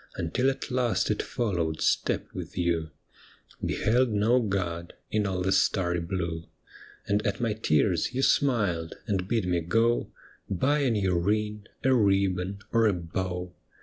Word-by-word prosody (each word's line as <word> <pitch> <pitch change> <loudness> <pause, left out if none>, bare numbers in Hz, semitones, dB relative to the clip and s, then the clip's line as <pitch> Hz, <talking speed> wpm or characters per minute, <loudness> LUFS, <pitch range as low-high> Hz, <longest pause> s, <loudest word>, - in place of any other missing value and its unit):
Until 125 +11 +1
at 135 -1 -4
last 125 -3 +1
it 105 - 0
followed 85 -9 -2
step - - +1
with - - -7
you, 85 -2 0 0.7
Beheld 120 +3 +2
no 110 +4 +3
God 90 -6 -2 0.2
in 105 -2 +1
all 90 -1 -1
the 95 - +1
starry 90 -3 +2
blue. 85 -1 -3 0.6
And 100 +1 +1
at 100 - -1
my 115 -3 0
tears 85 -3 +1
you 130 +2 -1
smiled, 100 -15 +1
and 95 -3 -1
bid 115 -2 0
me 90 -1 +1
go 115 +8 +1 0.4
Buy 135 +11 +1
a 140 -3 +2
new 95 -6 +1
ring, 105 +3 -1 0.2
a 130 - +4
ribbon, 100 -3 +1
or 115 -1 +5
a 105 - +3
bow. 90 +1 -4
100 Hz, 150 wpm, -27 LUFS, 90-115 Hz, 0.7 s, or